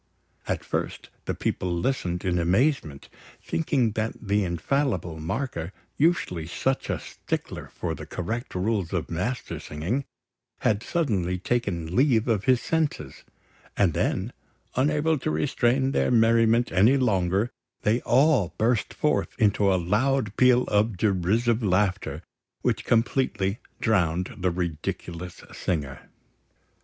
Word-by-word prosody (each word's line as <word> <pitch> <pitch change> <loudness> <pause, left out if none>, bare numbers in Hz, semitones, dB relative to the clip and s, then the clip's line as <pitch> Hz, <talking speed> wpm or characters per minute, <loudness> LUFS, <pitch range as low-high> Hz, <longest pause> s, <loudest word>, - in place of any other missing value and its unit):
At - - -2
first, - - -4
the - - -2
people 90 - -2
listened 90 -1 -1
in 90 -1 +1
amazement, 90 - +1 0.3
thinking 135 -8 0
that 110 +1 -2
the 100 -1 +1
infallible 90 - -1
marker, 85 - -3 0.2
usually 115 - +1
such 130 +9 -1
a - - 0
stickler - - -5
for 85 -2 -4
the 75 0 -8
correct 110 +7 -4
rules 95 -1 -1
of 85 -3 -2
Mastersinging, 95 - -3 0.6
had 105 -1 +2
suddenly 100 - 0
taken 90 -6 -2
leave 125 -4 +3
of 110 -4 +1
his 130 -2 +4
senses; 150 - -2 0.5
and 95 -6 +3
then, - - -1 0.4
unable 150 +3 +2
to - - -2
restrain 120 - +1
their - - +1
merriment 115 0 +4
any 110 +9 +5
longer, 100 -2 +1 0.3
they 110 +4 +2
all 130 - +3
burst 115 0 +1
forth 150 0 0
into 105 -2 +3
a - - +3
loud 105 +5 +1
peal 125 -1 +5
of 105 0 +1
derisive 110 +5 +1
laughter, 95 -2 0 0.4
which - - 0
completely 115 -4 +1 0.2
drowned 90 -5 +1
the 90 0 +1
ridiculous 85 0 -4
singer. 70 -6 -3
105 Hz, 125 wpm, -26 LUFS, 90-125 Hz, 0.6 s, any